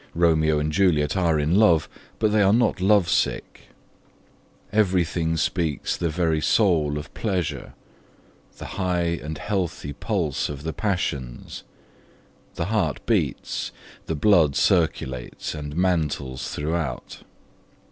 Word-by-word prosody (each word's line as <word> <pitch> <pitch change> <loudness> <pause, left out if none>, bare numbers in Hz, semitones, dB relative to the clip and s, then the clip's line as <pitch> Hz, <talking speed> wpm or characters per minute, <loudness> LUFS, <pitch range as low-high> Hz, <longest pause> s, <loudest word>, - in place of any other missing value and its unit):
Romeo 80 -2 +3
and 75 +1 -1
Juliet 80 -4 +2
are 85 -5 +2
in 75 +5 +2
love, 85 -7 +4 0.3
but 110 -1 +1
they 105 0 +3
are 100 -1 +5
not 110 -4 +2
love 100 -2 +4
sick. - - -1 1.1
Everything 90 -5 +1
speaks 80 -2 -1
the 85 - -1
very 80 -1 0
soul 80 -8 +2
of 75 +2 -8
pleasure, 85 - -3 0.8
the - - -8
high 90 -3 -1
and 75 0 -5
healthy 90 -8 -3
pulse 85 - -2
of 70 -1 -7
the 80 0 -3
passions: 70 - -3 0.9
the 85 - -2
heart 95 - -1
beats, - - -1 0.4
the 80 - -1
blood 80 -3 +4
circulates 70 - 0
and 75 -1 -6
mantles 75 -7 -1
throughout. 75 -4 -3
80 Hz, 120 wpm, -24 LUFS, 75-95 Hz, 1.1 s, are